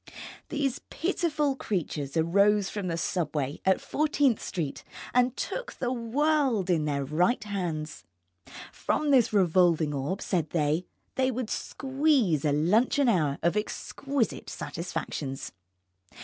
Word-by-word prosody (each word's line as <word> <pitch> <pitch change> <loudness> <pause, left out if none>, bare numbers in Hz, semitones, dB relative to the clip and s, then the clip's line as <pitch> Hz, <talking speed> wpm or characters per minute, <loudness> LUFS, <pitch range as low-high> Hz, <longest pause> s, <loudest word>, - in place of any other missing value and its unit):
These 280 -4 -1
pitiful 310 -5 0
creatures 155 - -3
arose 200 +5 +3
from 205 -3 -3
the 165 -1 -1
subway 150 -5 -2
at 190 0 +4
Fourteenth 290 -5 +1
Street 160 -7 -4 0.3
and 250 0 +3
took - - -4
the 250 -1 -2
world 250 - +1
in 160 -3 +2
their 140 -2 -1
right 175 - +1
hands. 170 - -4 0.7
From 300 -1 0
this 255 -5 +5
revolving 175 -5 +3
orb, 145 +8 -2
said 170 -5 -1
they, 155 +2 0 0.3
they 260 0 +3
would 250 -3 -3
squeeze 265 - +1
a 150 - +2
luncheon 215 - +3
hour 155 -9 +2
of 170 +3 +2
exquisite 265 +4 -2
satisfactions. 150 -5 -5
195 Hz, 120 wpm, -28 LUFS, 160-260 Hz, 0.7 s, this